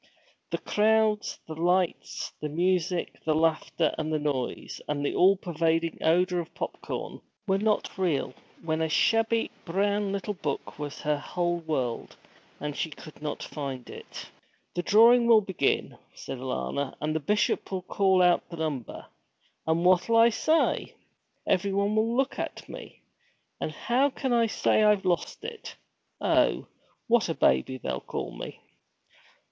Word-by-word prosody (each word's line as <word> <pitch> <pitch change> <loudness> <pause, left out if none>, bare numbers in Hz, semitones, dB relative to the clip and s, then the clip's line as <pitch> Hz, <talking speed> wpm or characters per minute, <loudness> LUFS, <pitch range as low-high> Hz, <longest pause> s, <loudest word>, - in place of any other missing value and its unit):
The - - -1
crowds, 215 0 +2
the 160 - -5
lights, 175 +2 0
the 150 - -2
music, 180 +2 0
the 155 -1 +1
laughter, 160 0 +1
and 155 0 -2
the 155 - +1
noise, 145 -4 -3
and 145 -1 -1
the 190 +6 +4
pervading 165 -1 0
odor 180 +2 +3
of 165 - -7
popcorn - - -5 0.2
were 195 -2 +1
not 210 -2 0
real, 160 -8 0 0.3
when 160 -1 -1
a 160 - 0
shabby 225 +6 +2
brown 200 +3 0
little 200 +1 -2
book 150 -5 -5
was 145 -1 -5
her 150 -1 0
whole 175 +3 -1
world, 135 -8 -3 0.4
and 150 -1 -4
she 160 - -2
could 155 0 -12
not 150 - -4
find 135 -4 -6
it. - - -10 0.4
'The 175 - -1
drawing 235 +6 +6
will 230 -2 +8
begin,' 190 -8 -1 0.2
said 130 - -7
Alanna, 130 - -3
'and 155 +1 -2
the - - +1
Bishop 210 +7 0
will 185 -1 -3
call 190 -1 +3
out 175 -1 +3
the 170 - -8
number! 150 -7 -4 0.6
And 165 +2 +1
what'll 185 +5 +4
I 230 +1 +7
say? 315 +8 +1 0.5
Everyone 200 +2 +1
will 225 +2 +1
look 270 +1 0
at - - -5
me; - - -11 0.6
and - - -2
how 245 - +1
can 265 -2 -2
I 230 -1 +4
say 220 - +2
I've 210 -2 +4
lost 180 - -1
it! 460 -1 -7 0.4
Oh, - - +2 0.4
what 235 -5 +3
a 165 - -1
baby 65 - +2
they'll 65 - -4
call - - -5
me!' - - -8
175 Hz, 150 wpm, -27 LUFS, 155-210 Hz, 0.6 s, will